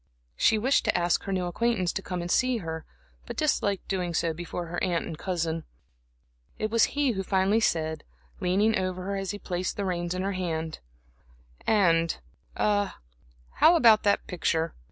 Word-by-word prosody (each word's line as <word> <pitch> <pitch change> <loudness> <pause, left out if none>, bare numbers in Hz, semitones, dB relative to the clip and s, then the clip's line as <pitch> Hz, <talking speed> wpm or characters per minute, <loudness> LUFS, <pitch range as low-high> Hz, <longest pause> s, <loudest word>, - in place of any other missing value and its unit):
She 220 - +3
wished 260 +6 +2
to - - +2
ask 175 0 +1
her 195 - -3
new 185 -1 0
acquaintance 185 0 0
to - - -2
come 180 -2 -4
to 170 - -4
see 255 +6 +2
her, 160 -5 -5 0.4
but - - -6
disliked 205 -10 0
doing 180 -3 -2
so 165 0 +1
before 175 +1 -5
her 175 +1 -4
aunt 175 -3 0
and 165 - -5
cousin. 165 -2 -2 0.9
It 215 0 -2
was 230 +4 +2
he 285 -3 +3
who 195 -4 -2
finally 195 +3 +2
said, 160 -6 0 0.4
leaning 200 +5 +2
over 185 -1 -2
her 200 +1 -3
as 195 -1 -3
he 205 - -3
placed 185 -2 -3
the 200 - -1
reins 175 -1 -2
in 185 - -2
her 195 - -1
hand: 165 -4 -3 0.9
"And 170 -6 +3 0.4
a 205 -1 +1 0.6
how 335 - +7
about 230 -9 +6
that 200 -1 +2
picture? 165 -2 -1
185 Hz, 175 wpm, -27 LUFS, 170-205 Hz, 0.9 s, how